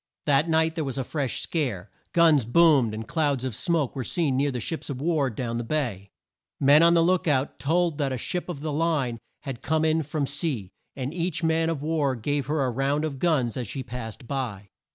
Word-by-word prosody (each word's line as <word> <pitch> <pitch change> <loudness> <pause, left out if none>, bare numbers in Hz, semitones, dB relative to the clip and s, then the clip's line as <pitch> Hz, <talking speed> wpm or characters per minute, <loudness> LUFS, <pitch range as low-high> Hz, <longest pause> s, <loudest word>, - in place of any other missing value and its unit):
That 145 +2 +3
night 160 0 +3
there 160 -2 -2
was 135 -2 -4
a 135 - 0
fresh 135 -2 -2
scare. 115 - -2 0.2
Guns 160 -5 +5
boomed 135 -3 +4
and 110 +1 -6
clouds 145 -6 0
of 130 - -3
smoke 165 -5 0
were 130 - -2
seen 150 0 0
near 140 +2 +2
the 125 -3 -3
ships 160 +8 -4
of 135 -3 -4
war 150 -3 +1
down 115 0 -3
the 120 - -2
bay. 115 -7 -2 0.5
Men 145 +2 +6
on 170 +1 +6
the 165 - +5
look 180 0 +2
out 140 -2 +1
told 165 +1 +1
that 140 -2 0
a 130 - -2
ship 180 +9 -3
of 150 -5 -5
the 155 -1 -3
line 145 -7 0 0.2
had 135 -5 -6
come 160 0 +1
in 160 0 +2
from 150 -1 -2
sea, 140 - -3 0.2
and 135 +2 -4
each 175 -1 -2
man 160 0 +2
of 155 -4 -3
war 150 -4 +1
gave 140 +4 -2
her 150 -2 +1
a 125 - 0
round 140 +5 0
of 140 -4 -5
guns 140 -9 +1
as 125 -3 -3
she 130 +7 -4
passed 120 0 -7
by. 115 -8 -4
145 Hz, 220 wpm, -26 LUFS, 125-160 Hz, 0.5 s, Men